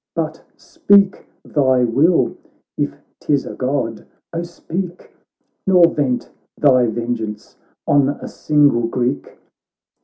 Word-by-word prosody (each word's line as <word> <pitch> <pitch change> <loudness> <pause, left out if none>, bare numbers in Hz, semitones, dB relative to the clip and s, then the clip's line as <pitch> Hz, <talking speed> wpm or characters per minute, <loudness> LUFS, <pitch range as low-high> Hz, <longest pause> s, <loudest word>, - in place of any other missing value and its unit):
But 160 -1 -3 0.2
speak 200 -1 +2 0.2
thy 130 -4 +2
will, 155 +10 +2 0.4
if 145 -1 -2 0.2
'tis 145 -2 0
a - - -7
God, 125 -4 -3 0.3
oh 165 - -2
speak! 175 +1 -6 0.6
Nor 180 -3 +5
vent 130 -4 -1 0.3
thy 130 -4 +4
vengeance 110 -2 -4 0.3
on 140 -1 +3
a 145 - -5
single 145 -6 +2
Greek.' 125 +3 -3
145 Hz, 110 wpm, -19 LUFS, 120-165 Hz, 0.6 s, Nor